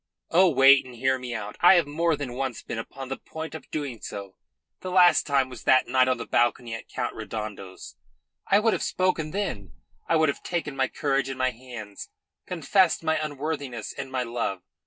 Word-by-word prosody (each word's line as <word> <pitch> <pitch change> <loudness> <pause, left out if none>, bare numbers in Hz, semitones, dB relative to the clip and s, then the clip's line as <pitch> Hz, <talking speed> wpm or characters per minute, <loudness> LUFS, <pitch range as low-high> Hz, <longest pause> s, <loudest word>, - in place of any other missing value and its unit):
Oh, 180 +2 +6
wait, 135 -2 +6
and 125 -1 -12
hear 130 +2 +1
me 125 -2 -5
out. 105 -1 -6
I 175 +2 +8
have 170 -3 +4
more 160 +3 +1
than 140 -4 -5
once 130 -2 -4
been 115 - -5
upon 130 +3 -8
the 135 - -3
point 160 0 -7
of 160 - -9
doing 140 -7 -4
so 100 -2 -7 0.5
the 185 - -6
last 180 -1 +5
time 140 -3 +2
was 125 -4 -10
that 130 0 +4
night 130 -1 +3
on 130 -1 +1
the 115 - -6
balcony 120 -1 +1
at 115 - -7
Count - - -3
Redondo's. 105 -4 -7 0.5
I 200 - +5
would 220 +1 +3
have - - -2
spoken 185 -4 0
then; 155 - -4 0.4
I 165 - +4
would 160 -2 +4
have - - -3
taken 165 -5 -3
my 135 -1 +1
courage 135 -1 -1
in 135 - -5
my 130 0 +1
hands, 115 -4 -9 0.4
confessed 180 +1 +2
my 160 -1 +1
unworthiness 145 -6 -4
and 135 -1 -7
my 130 -1 -1
love. 115 -6 -3
135 Hz, 200 wpm, -26 LUFS, 120-160 Hz, 0.5 s, I